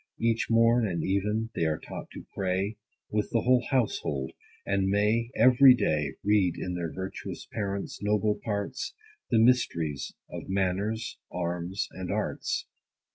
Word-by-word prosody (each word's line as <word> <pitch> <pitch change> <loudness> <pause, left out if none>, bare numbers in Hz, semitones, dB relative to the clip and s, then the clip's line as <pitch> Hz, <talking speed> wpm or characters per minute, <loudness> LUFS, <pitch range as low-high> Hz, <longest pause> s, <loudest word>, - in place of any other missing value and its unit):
Each 115 0 +1
morn, 115 0 +4
and 85 -4 -2
even, 105 +4 0
they - - -1
are 80 -1 +1
taught - - -8
to - - -9
pray, 95 +2 -1 0.4
With 105 0 0
the 115 - +1
whole 125 0 +4
household, 75 - 0 0.3
and 95 -1 +1
may, 105 +4 +2
every 125 +2 +7
day, 75 - 0
Read 100 -4 +3
in 90 - -3
their 85 -2 -3
virtuous 95 +1 -6
parents' 100 -1 -4
noble 105 0 +1
parts, 105 - -3 0.3
The 115 - +3
mysteries 85 - +2
of - - -8
manners, 100 +4 -1
arms, 90 +2 -2
and 95 -1 -5
arts. - - -2
100 Hz, 140 wpm, -28 LUFS, 90-115 Hz, 0.4 s, every